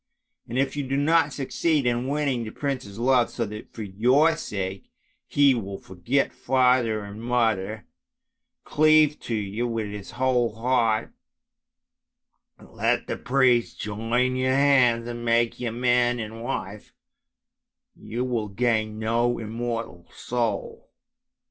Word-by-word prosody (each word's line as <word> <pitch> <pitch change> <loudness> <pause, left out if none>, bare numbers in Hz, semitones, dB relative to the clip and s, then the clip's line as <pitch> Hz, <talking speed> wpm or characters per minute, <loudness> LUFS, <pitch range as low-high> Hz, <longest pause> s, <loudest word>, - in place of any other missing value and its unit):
And 120 - -3
if 135 +1 0
you 145 - -1
do 135 0 -2
not 155 +1 +3
succeed 145 +2 0
in 120 +1 0
winning 140 -4 -1
the 110 - -6
prince's 130 -6 -4
love, 125 0 +3
so 115 - -3
that 105 +1 -9
for 110 - -7
your 125 +11 +3
sake 95 -8 -5 0.4
he 140 -1 +4
will 100 -5 -4
forget 115 +12 -1
father 125 -4 +2
and 100 +2 -9
mother, 110 -3 0 0.8
cleave 155 0 +4
to 115 - -4
you 105 +3 -2
with 115 -3 -3
his 105 -1 -8
whole 125 -4 +1
heart, 115 -2 +1 1.5
let - - -1
the - - -3
priest 125 -3 +2
join 115 +5 -1
your 130 0 +1
hands 130 -4 +4
and 120 0 -6
make 115 0 +1
you 120 -2 -2
man 120 0 +2
and 110 0 -6
wife, 100 -4 -5 1.0
you 120 +3 -4
will 120 -4 -2
gain 110 0 0
no 115 +2 0
immortal 115 -5 -5
soul! 115 -4 -3
120 Hz, 130 wpm, -25 LUFS, 110-130 Hz, 1.5 s, he